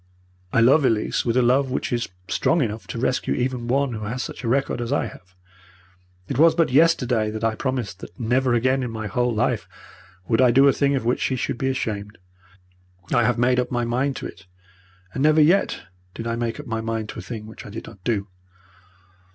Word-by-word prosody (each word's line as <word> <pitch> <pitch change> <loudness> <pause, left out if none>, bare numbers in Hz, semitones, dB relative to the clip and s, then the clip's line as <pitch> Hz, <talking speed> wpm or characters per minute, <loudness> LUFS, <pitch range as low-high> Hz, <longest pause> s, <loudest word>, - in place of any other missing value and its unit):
'I 115 - +3
love 135 +6 +5
Elise 115 -5 +1
with 120 0 +1
a 125 - +4
love 130 +3 +3
which 130 - -2
is 120 -1 -1 0.2
strong 165 -3 +2
enough 110 -1 -4
to - - -6
rescue 125 +2 0
even 125 -1 -2
one 135 +1 +1
who 110 -1 -5
has 125 +4 -3
such - - -7
a - - -2
record 130 0 0
as 120 +1 -3
I 145 - +1
have. 95 +1 -12 0.9
It 135 - -3
was 160 0 +6
but 165 -5 +2
yesterday 125 -7 +3
that 110 +1 -5
I 115 0 +2
promised 115 -6 -3
her - - -6
that 90 - -26
never 125 +2 +2
again 130 +3 +2
in 125 - -3
my 110 -1 -5
whole 120 +4 0
life 110 - -1 0.6
would 115 - +2
I 125 - +6
do 135 +3 +6
a 140 - +5
thing 140 -1 +1
of 130 - -2
which 120 - +1
she 130 - 0
should 120 - -3
be 135 - 0
ashamed. 105 -5 -3 1.0
I - - +4
have 120 -1 +1
made 125 +1 +3
up 125 0 -1
my 120 -1 -1
mind 130 +4 0
to - - -6
it, - - -10 0.7
and - - -3
never 155 +2 +4
yet 170 +6 +3 0.3
did 115 - -6
I 115 0 -1
make 120 +2 -3
up 150 - -7
my 115 -3 -3
mind 110 -1 -3
to - - -7
a - - -5
thing 110 -3 -7
which 110 - -11
I - - -10
did 110 +2 -7
not 100 -5 -14
do.' 105 -3 -1
120 Hz, 225 wpm, -23 LUFS, 115-130 Hz, 1.0 s, was